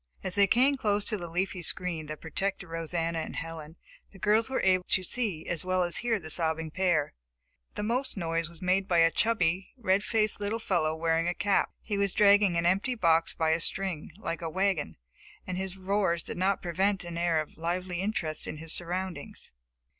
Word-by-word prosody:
As 185 Hz, -, -2 dB
they 200 Hz, 0 st, +5 dB
came 265 Hz, +6 st, +4 dB
close 205 Hz, -4 st, +1 dB
to 215 Hz, -, +2 dB
the 175 Hz, -4 st, -5 dB
leafy 180 Hz, +1 st, -2 dB
screen 165 Hz, -2 st, +1 dB
that 155 Hz, 0 st, -7 dB
protected 195 Hz, +4 st, -3 dB
Rosanna 165 Hz, 0 st, -2 dB
and 160 Hz, -, -5 dB
Helen, 160 Hz, -1 st, -6 dB, 0.3 s
the -, -, -16 dB
girls 215 Hz, +4 st, +2 dB
were 265 Hz, -, 0 dB
able 185 Hz, -1 st, +3 dB
to 185 Hz, -, +2 dB
see 195 Hz, -6 st, -2 dB
as 170 Hz, -3 st, -2 dB
well 185 Hz, 0 st, +1 dB
as 175 Hz, -1 st, +1 dB
hear 235 Hz, -1 st, +1 dB
the 155 Hz, -3 st, -5 dB
sobbing 160 Hz, -1 st, 0 dB
pair. 175 Hz, -4 st, +1 dB, 0.6 s
The 210 Hz, -, -3 dB
most 245 Hz, +3 st, -1 dB
noise 165 Hz, -2 st, -1 dB
was 170 Hz, +1 st, -11 dB
made 190 Hz, +1 st, +2 dB
by 175 Hz, -4 st, +2 dB
a 165 Hz, 0 st, +5 dB
chubby, 185 Hz, -5 st, +1 dB
red 200 Hz, -4 st, +1 dB
faced 215 Hz, -2 st, +1 dB
little 205 Hz, +2 st, -1 dB
fellow 170 Hz, -8 st, 0 dB
wearing 165 Hz, +1 st, +1 dB
a 175 Hz, -, 0 dB
cap. 200 Hz, -1 st, +2 dB
He 205 Hz, -2 st, -2 dB
was 200 Hz, -2 st, +1 dB
dragging 205 Hz, -3 st, +5 dB
an 170 Hz, -, 0 dB
empty 195 Hz, +8 st, +2 dB
box 165 Hz, -6 st, +2 dB
by 160 Hz, -1 st, +1 dB
a 160 Hz, -, +2 dB
string, 180 Hz, -2 st, -1 dB
like 170 Hz, -6 st, -4 dB
a -, -, -4 dB
little 160 Hz, -, -5 dB
wagon, 190 Hz, -5 st, 0 dB, 0.5 s
and 185 Hz, -, -4 dB
his 190 Hz, 0 st, -4 dB
roars 190 Hz, -3 st, 0 dB
did -, -, -6 dB
not 190 Hz, +2 st, 0 dB
prevent 190 Hz, +3 st, 0 dB
an 170 Hz, -1 st, -5 dB
air 170 Hz, -2 st, +2 dB
of 155 Hz, -, -5 dB
lively 175 Hz, +2 st, -2 dB
interest 175 Hz, -7 st, -2 dB
in -, -, -5 dB
his 160 Hz, +1 st, -4 dB
surroundings. 180 Hz, +1 st, -4 dB
180 Hz, 205 wpm, -29 LUFS, 165-200 Hz, 0.6 s, they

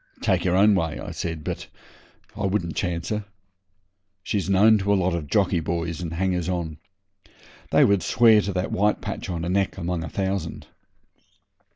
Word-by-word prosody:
'Take -, -, +1 dB
your 90 Hz, -1 st, +1 dB
own 105 Hz, +2 st, +6 dB
way,' 80 Hz, -6 st, -1 dB
I -, -, -6 dB
said, 80 Hz, -2 st, -4 dB
'but -, -, -5 dB, 0.7 s
I 105 Hz, -2 st, -1 dB
wouldn't 90 Hz, -4 st, -1 dB
chance 85 Hz, -1 st, -2 dB
her. 105 Hz, -1 st, -2 dB, 1.0 s
She's 100 Hz, -2 st, -2 dB
known 105 Hz, +3 st, +5 dB
to 100 Hz, +1 st, 0 dB
a -, -, +5 dB
lot 95 Hz, -2 st, +1 dB
of 80 Hz, -4 st, -3 dB
jockey 95 Hz, 0 st, +2 dB
boys 85 Hz, 0 st, -3 dB
and 85 Hz, -2 st, -4 dB
hangers 90 Hz, 0 st, -1 dB
on. 85 Hz, -4 st, -3 dB, 0.9 s
They -, -, +5 dB
could 100 Hz, -2 st, +3 dB
swear 110 Hz, +2 st, +5 dB
to 100 Hz, 0 st, -3 dB
that 90 Hz, 0 st, -2 dB
white 105 Hz, +2 st, +1 dB
patch -, -, -5 dB
on 85 Hz, -2 st, -3 dB
her -, -, -3 dB
neck 100 Hz, +1 st, 0 dB
among 85 Hz, -2 st, -2 dB
a 80 Hz, -, -5 dB
thousand.' 95 Hz, -2 st, -3 dB
90 Hz, 180 wpm, -24 LUFS, 85-100 Hz, 1.0 s, own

